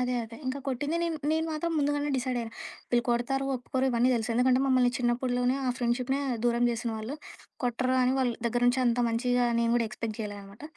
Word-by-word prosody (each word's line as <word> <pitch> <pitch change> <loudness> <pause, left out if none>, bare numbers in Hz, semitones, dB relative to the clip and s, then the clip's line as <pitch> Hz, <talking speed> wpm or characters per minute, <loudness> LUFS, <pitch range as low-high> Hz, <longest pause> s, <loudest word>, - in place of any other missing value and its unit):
అదే 250 0 0
అదే. 230 +1 -11
ఇంక 260 +2 -1
కొట్టింది. 290 +5 -1
నేను 335 -2 -1
నేను 320 0 +1
మాత్రం 330 +2 -2
ముందుగానే 290 0 0
డిసైడయ్యా. 245 -3 -2 0.4
వీళ్ళు 240 -1 +2
కొడతారు, 245 +3 0
ఒప్పుకోరు 260 +1 -1
ఇవన్నీ 240 +2 +3
తెలుసు. 230 -1 -1
ఎందుకంటే 255 +1 +3
మమ్మల్ని 255 -2 +4
చిన్నప్పడులోనే 245 +1 +1
ఆ - - +2
ఫ్రెండ్షిప్‌నే 250 +3 0 0.2
దూరం 240 0 +2
జేసిన 235 0 -2
వాళ్ళు. 225 +7 -5 0.5
కొట్టరు 255 +1 0
అని 250 +1 +2
వాళ్ళ 250 -2 +2
దగ్గర 240 +1 0
నుంచి 250 +1 +3
అంత 240 0 +2
మంచిగా 245 +1 +1
నేను 230 0 +2
గూడా 230 -2 +1
ఎక్స్‌పెక్ట్ 215 0 -5
జేయలే 205 -1 -5
అనమాట. 200 +6 -14
245 Hz, 190 wpm, -28 LUFS, 235-260 Hz, 0.5 s, మమ్మల్ని